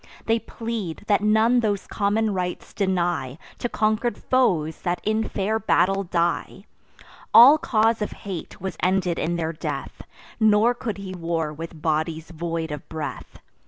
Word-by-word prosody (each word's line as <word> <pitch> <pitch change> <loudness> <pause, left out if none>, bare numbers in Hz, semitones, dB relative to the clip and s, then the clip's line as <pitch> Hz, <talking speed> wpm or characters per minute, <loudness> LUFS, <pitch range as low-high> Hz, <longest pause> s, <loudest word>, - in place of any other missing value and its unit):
They 225 +1 +2
plead, 225 -8 -5
that 205 -2 +2
none 220 +3 +4
those 205 -4 -1
common 210 +1 0
rites 180 -1 -4
deny 175 -8 -1 0.2
To 240 - -2
conquer'd 220 +2 0
foes 170 -12 +1
that 175 0 -1
in 220 +1 0
fair 210 +3 -1
battle 195 -1 +2
die. 170 -1 -1 0.7
All 275 +7 +10
cause 225 -7 +2
of 210 - -2
hate 185 -5 -6
was 190 +1 -5
ended 180 -2 +1
in 170 +1 -1
their 165 -1 -2
death; 150 -3 -5 0.4
Nor 220 +2 +4
could 235 -4 -5
he 195 -1 -7
war 165 -3 -2
with 165 +1 -8
bodies 160 +1 -1
void 165 -1 -3
of 150 -1 -7
breath. 155 -2 -6
190 Hz, 150 wpm, -24 LUFS, 165-220 Hz, 0.7 s, All